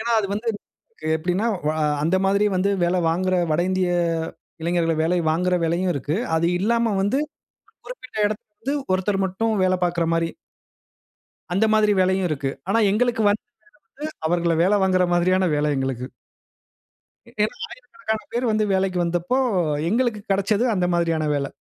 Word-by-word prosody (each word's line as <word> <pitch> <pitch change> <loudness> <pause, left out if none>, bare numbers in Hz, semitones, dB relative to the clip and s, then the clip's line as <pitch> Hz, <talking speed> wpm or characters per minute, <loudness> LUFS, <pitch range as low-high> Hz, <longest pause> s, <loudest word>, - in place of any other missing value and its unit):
ஏன்னா, 235 +1 -1
அது 205 - 0
வந்து 225 +3 -3 0.7
எப்படின்னா 180 +7 -1 0.2
வா 155 - +1 0.3
அந்த 165 +5 +2
மாதிரி 200 +2 +2
வந்து 195 +2 +1
வேல 175 +1 +2
வாங்குற 185 +3 +1
வட 155 +2 +2
இந்திய 185 -1 +1 0.7
இளைஞர்களை 165 -1 +1
வேலை 180 +2 +1
வாங்குற 180 +3 +1
வேலையும் 175 +3 +1
இருக்கு. 145 +3 -2 0.2
அது 165 +1 +2
இல்லாம 230 +1 +1
வந்து 205 +7 +1 0.5
ஒரு - - -30
குறிப்பிட்ட 375 - -9
இடத்து 215 +5 -5 0.2
ஒருத்தர் 195 +1 0
மட்டும் 205 +5 -1
வேலை 185 0 +2
பாக்கிற 175 -1 +1
மாரி 165 0 +1 1.2
அந்த 210 +4 +3
மாதிரி 215 -1 +4
வேலையும் 190 0 +2
இருக்கு. 140 -3 -2 0.2
ஆனா 225 - +3
எங்களுக்கு 235 +2 +1
வந்த 205 +1 0
வேல 245 - -55 0.5
வந்து, - - -6 0.2
அவர்கள 170 0 +1
வேல 195 +4 +3
வாங்குற 185 -1 +3
மாதிரியான 185 +1 +2
வேல 150 0 +1
எங்களுக்கு. 130 -2 -2 1.3
ஏன்னா, - - 0 0.3
1000க்கணக்கான 220 - -4
பேரு 240 +2 0
வந்து 215 0 +1
வேலைக்கு 190 -1 0
வந்தப்போ, 175 +9 0 0.5
எங்களுக்கு 235 -2 0
கெடச்சது 200 +4 +1
அந்த 180 -2 +1
மாதிரியான 165 -2 0
வேலை. 140 -1 -2
185 Hz, 150 wpm, -23 LUFS, 170-215 Hz, 1.3 s, மாதிரி